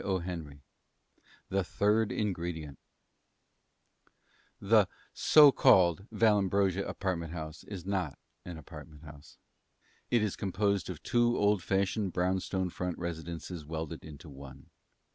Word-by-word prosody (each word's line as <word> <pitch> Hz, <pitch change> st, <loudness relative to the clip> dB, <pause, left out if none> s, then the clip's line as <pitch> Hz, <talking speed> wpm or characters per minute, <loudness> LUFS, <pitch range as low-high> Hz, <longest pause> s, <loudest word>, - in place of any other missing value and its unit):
Roosevelt 90 Hz, -6 st, -3 dB, 1.0 s
THE 95 Hz, 0 st, +1 dB
THIRD 105 Hz, +4 st, +1 dB
INGREDIENT 85 Hz, -8 st, -3 dB, 1.8 s
The 105 Hz, -1 st, +4 dB, 0.3 s
(so 150 Hz, -2 st, +7 dB
called) 90 Hz, -4 st, +4 dB
Vallambrosa 100 Hz, -3 st, +2 dB
Apartment 85 Hz, -4 st, -3 dB
House 80 Hz, -1 st, -7 dB
is 95 Hz, -4 st, -8 dB
not 95 Hz, -7 st, -2 dB, 0.3 s
an 90 Hz, -2 st, -8 dB
apartment 75 Hz, -1 st, -12 dB
house. 75 Hz, -1 st, -14 dB, 0.7 s
It 120 Hz, -3 st, +2 dB
is 105 Hz, -, -1 dB
composed 100 Hz, 0 st, -1 dB
of 90 Hz, -, -7 dB
two 120 Hz, 0 st, +2 dB
old 105 Hz, -1 st, +2 dB
fashioned, 100 Hz, +1 st, 0 dB
brownstone 95 Hz, 0 st, -1 dB
front 90 Hz, -1 st, -4 dB
residences 85 Hz, 0 st, -6 dB
welded 80 Hz, +1 st, -6 dB
into 80 Hz, 0 st, -11 dB
one. 70 Hz, -1 st, -12 dB
90 Hz, 110 wpm, -31 LUFS, 80-100 Hz, 1.8 s, so